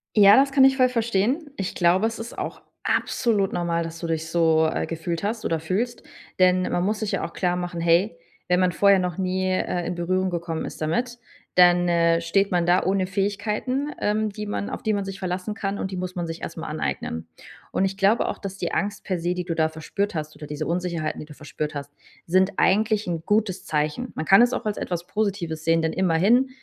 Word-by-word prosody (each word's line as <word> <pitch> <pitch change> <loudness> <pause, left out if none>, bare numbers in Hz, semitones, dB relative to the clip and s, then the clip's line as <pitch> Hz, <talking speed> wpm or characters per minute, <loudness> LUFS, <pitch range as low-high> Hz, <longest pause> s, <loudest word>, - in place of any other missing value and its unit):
Ja, 205 -1 +8
das 275 +2 +4
kann 270 -1 +5
ich 265 0 +4
voll 255 -1 +4
verstehen. 235 - 0
Ich 195 -2 -3
glaube, 180 +4 +3
es 225 0 -5
ist 230 +1 -7
auch - - -5 0.2
absolut 210 -5 +1
normal, 170 -1 0
dass 165 0 -7
du 170 - -4
dich 160 -1 -2
so, 160 -1 +3
äh, - - -1
gefühlt 165 +1 -4
hast 220 +2 -2
oder 165 - 0
fühlst, 205 +10 -2 0.4
denn 185 0 +4
man 175 - 0
muss 210 +3 0
sich 215 - -1
ja - - -1
auch - - -8
klarmachen: 175 -1 -2
„Hey, 170 +3 +2 0.3
wenn 180 0 +3
man 185 -1 +3
vorher 200 +2 +4
noch 180 -3 -2
nie, 185 0 -1
äh, 180 -1 -1
in 175 - -3
Berührung 185 +2 0
gekommen 170 -2 -3
ist - - -8
damit, 240 +10 -1 0.4
dann, 175 0 +6
äh, 170 -1 +3
steht 195 +4 +1
man 175 -2 +2
da 175 +1 +3
ohne 190 0 +1
Fähigkeiten, 210 +8 -1
ähm, 215 +1 0
die 210 +1 -6
man 205 0 -3
auf - - -6
die 215 - +1
man 200 -1 -1
sich 195 0 -6
verlassen 185 +2 -3
kann 200 -2 -3
und 190 - -3
die 185 - -4
muss 180 0 -4
man 175 -1 -2
sich 165 0 -6
erst 165 - -6
mal 165 - -5
aneignen“. 85 - -3 0.4
Und - - +1
ich 195 0 -3
glaube 200 +4 +3
auch, - - -4
dass 195 -1 -7
die - - -3
Angst 205 0 -2
per 185 -2 -2
se, 175 +2 0
die 180 0 -3
du 175 -1 -3
da 160 -1 +2
verspürt 170 +6 -3
hast 155 -1 -4
oder 150 - -9
diese 150 +1 -4
Unsicherheiten, 170 -2 -2
die - - -7
du 150 - -12
verspürt 150 0 -5
hast, 145 0 -6 0.3
sind 185 +3 +2
eigentlich 215 +1 +2
'n 165 -2 -3
gutes 200 -3 0
Zeichen. 155 +11 -2
Man 155 - -3
kann 195 +6 +7
es 245 +1 +4
auch - - -3
als 210 -1 -1
etwas 175 -1 -3
Positives 190 -7 -2
sehen, 165 0 +3
denn 160 0 -1
immerhin 190 +9 +3
185 Hz, 230 wpm, -24 LUFS, 170-205 Hz, 0.4 s, Ja